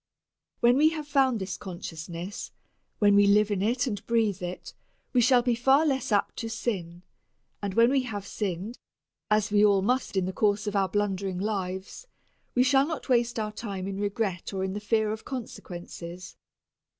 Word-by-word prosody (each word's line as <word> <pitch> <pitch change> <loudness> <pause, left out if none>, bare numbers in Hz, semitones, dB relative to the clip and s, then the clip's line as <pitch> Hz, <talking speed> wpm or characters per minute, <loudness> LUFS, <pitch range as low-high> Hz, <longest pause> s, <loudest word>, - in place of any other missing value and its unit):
When 240 +1 +5
we 305 +2 +6
have 310 -2 -5
found 265 -5 +2
this 190 0 -4
consciousness 175 +1 -7 0.5
when 205 -1 +4
we 205 0 +6
live 210 +1 +4
it 220 +6 +1
and 205 -6 -3
breathe 220 -5 +1
it, 180 0 -6 0.4
we 250 - +4
shall 245 +1 +5
be 245 -1 +2
far 270 +6 +4
less 265 -4 0
apt 205 -1 +1
to 230 - -4
sin, 185 -7 -4 0.6
and 200 -2 -3
when 235 +2 +5
we 275 -1 +3
have 210 -5 -5
sinned, 200 +3 -4 0.5
as 215 0 +2
we 205 0 +4
all 200 -2 +4
must 250 -2 0
in 185 - +2
the 185 - -3
course 210 +1 +1
of 205 -1 -3
our 195 -1 +2
blundering 195 -2 -1
lives, 190 - -4 0.5
we 250 - +5
shall 270 +2 +4
not 320 -3 -5
waste 240 -1 +2
our 215 -1 -2
time 200 -3 -5
in 195 0 -4
regret 200 -3 -2
or 190 - -1
in 190 0 -2
the 205 - -3
fear 215 0 +1
of 220 0 -5
consequences. 180 -7 -8
210 Hz, 180 wpm, -27 LUFS, 190-240 Hz, 0.6 s, we